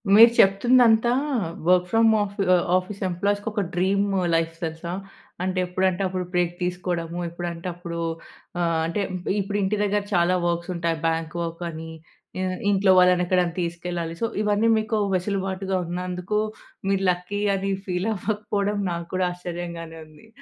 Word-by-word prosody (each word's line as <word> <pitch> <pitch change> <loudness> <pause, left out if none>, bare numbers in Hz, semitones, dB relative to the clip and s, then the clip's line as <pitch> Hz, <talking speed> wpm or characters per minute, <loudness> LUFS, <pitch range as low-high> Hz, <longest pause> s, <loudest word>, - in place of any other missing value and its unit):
మీరు 230 +2 +9
చెప్తుదంతా 230 +3 +5 0.6
work 180 0 +5
from 225 0 +5
ఆఫీ 205 0 -3
ఆహ్, 175 - +1
office 185 +2 -5
ఎంప్లాయీస్‌కి 200 +4 -1
ఒక 210 -1 -1
డ్రీము 195 +2 +1 0.2
లైఫ్ 165 0 0
తెలుసా? 165 +1 -4 0.5
అంటే 185 0 -1
ఎప్పుడంటే 185 +1 0
అప్పుడు 185 -1 -3
బ్రేక్ 175 -1 +2
తీసుకోవడము, 175 -1 -2
ఎప్పుడంటే 170 0 -5
అప్పుడు 170 -1 -6 0.6
ఆహ్, 165 -1 +1
అంటే 170 +5 -1 0.4
ఇప్పుడు 200 +1 -2
ఇంటి 200 +2 0
దగ్గర 205 0 +1
చాలా 175 0 +3
వర్క్స్ 170 +1 -2
ఉంటాయి. 170 -1 -1
బాంక్ 165 0 -2
వర్క్ 170 +1 -5
అని, 160 0 -7 0.5
ఆహ్, 185 -1 -1
ఇంట్లో 195 -1 +4
వాళ్ళని 180 0 +4
ఎక్కడైనా 180 -2 +1
తీసుకెళ్లాలి. 170 -1 -4
సో - - +3 0.2
ఇవన్నీ 210 +2 +2
మీకు 220 0 -1 0.2
వెసులుబాటుగా 190 0 -1
ఉన్నందుకు 180 +3 -2 0.5
మీరు 195 0 +1
లక్కీ 180 +3 -4
అని 195 +1 -2 0.2
ఫీల్ 180 +4 -1
అవ్వకపోవడం 205 0 -1
నాక్కూడా 170 +2 -2
ఆశ్చర్యంగానే 170 -2 -6
ఉంది. 155 +6 -18
180 Hz, 140 wpm, -24 LUFS, 170-200 Hz, 0.6 s, మీరు